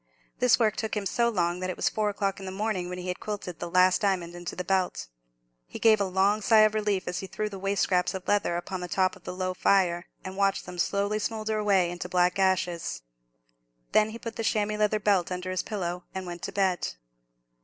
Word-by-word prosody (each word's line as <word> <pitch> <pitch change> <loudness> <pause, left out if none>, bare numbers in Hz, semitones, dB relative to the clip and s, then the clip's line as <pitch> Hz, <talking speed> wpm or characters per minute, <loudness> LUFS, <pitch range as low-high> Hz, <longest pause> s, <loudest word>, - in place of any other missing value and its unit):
This 250 -2 +5
work 220 -3 +2
took 220 -1 -2
him 205 - -2
so 235 +4 +2
long, 175 -5 0
that 185 0 -3
it 185 - -3
was - - 0
four 215 -1 0
o'clock 200 -1 -2
in 190 - -7
the - - -4
morning 190 -2 -2
when 180 - -5
he 180 0 -6
had 180 - -3
quilted 200 -5 -5
the 175 - -4
last 185 +1 +4
diamond 185 -4 0
into 175 -1 -6
the 180 - -3
belt. 190 -1 0 0.6
He - - -8
gave 220 -2 +5
a - - +2
long 195 +3 +2
sigh 220 +1 +6
of 215 0 +5
relief 210 -3 0
as 180 - -2
he 190 - -6
threw 215 +2 -3
the 195 -2 -8
waste 195 +1 0
scraps 180 0 +1
of 185 - -7
leather 205 -4 +2
upon 185 +2 -4
the 180 - -4
top 185 +1 +1
of - - -19
the - - -4
low 185 0 -2
fire, 180 -2 +2 0.2
and 190 0 -6
watched 195 0 +1
them 180 0 -8
slowly 200 +3 0
smoulder 215 0 -2
away 195 -4 +3
into 175 0 -6
black 180 +1 +2
ashes. 175 - 0 0.9
Then 215 0 +4
he 225 - -7
put 230 -1 -7
the 225 - -2
chamois 215 -1 0
leather 215 0 +2
belt 195 -4 +2
under 180 0 -3
his 185 - 0
pillow, 180 -4 -4
and 190 -1 -4
went 175 -1 -7
to - - -4
bed. 190 -3 0
190 Hz, 235 wpm, -27 LUFS, 180-210 Hz, 0.9 s, sigh